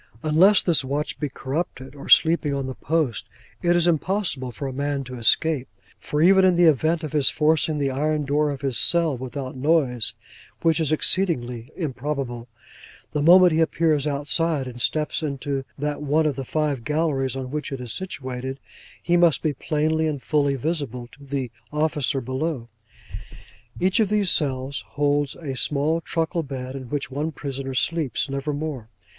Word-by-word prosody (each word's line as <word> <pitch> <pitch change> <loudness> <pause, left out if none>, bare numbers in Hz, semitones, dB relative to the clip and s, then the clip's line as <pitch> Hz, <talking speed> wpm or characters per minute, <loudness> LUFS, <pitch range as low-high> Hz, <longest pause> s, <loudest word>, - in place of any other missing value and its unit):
Unless 180 +7 +5
this 165 -6 +3
watch 145 +3 -3
be 150 - -2
corrupted 135 -1 -4
or 140 - -10
sleeping 160 -3 +5
on 135 -1 -2
his 130 -1 -5
post, 155 -6 -1 0.3
it 175 0 +3
is 175 -1 +3
impossible 170 -6 0
for 130 +4 -6
a 135 - -5
man 140 +1 -2
to 125 0 -9
escape; 135 +4 +2 0.3
for 150 +1 -1
even 190 +2 +6
in 185 -1 +5
the 175 - +4
event 160 +2 +3
of 155 - -4
his 145 -3 +3
forcing 155 0 +1
the 140 -2 0
iron 150 +2 0
door 150 +2 +1
of 140 -2 -5
his 135 -4 0
cell 170 -4 +3
without 130 +1 -6
noise 130 -6 +1 0.5
(which 165 -2 +3
is 155 -3 +1
exceedingly 125 -9 +2
improbable), 135 -5 -4 0.6
the 150 - -1
moment 180 +3 +7
he 160 - +1
appears 160 -2 +2
outside, 145 +1 0
and 120 -1 -7
steps 155 +5 0
into 140 -2 -3
that 145 +1 -3
one 150 +2 +1
of 150 -3 0
the 135 - -5
five 145 -4 -1
galleries 150 -3 0
on 130 -1 -5
which 150 0 -4
it 135 - -4
is 120 -2 -3
situated, 130 -7 -5 0.4
he 175 - +2
must 170 -3 +4
be 155 -2 +1
plainly 155 +3 0
and 145 -4 -3
fully 145 -2 +1
visible 135 -4 -3
to 140 - -16
the 135 -3 -4 0.2
officer 150 -3 0
below. 130 0 -3 1.1
Each 185 +4 +2
of 215 -3 +2
these 205 -3 +2
cells 135 -2 -1
holds 145 -1 +1
a 140 -5 -6
small 150 +5 0
truckle 165 +1 -1
bed, 130 -3 -6
in 130 -3 -7
which 140 -1 -3
one 150 +4 -2
prisoner 135 -3 -5
sleeps; 150 +3 0
never 140 +2 -2
more. 145 -6 -5
145 Hz, 175 wpm, -23 LUFS, 135-160 Hz, 1.1 s, moment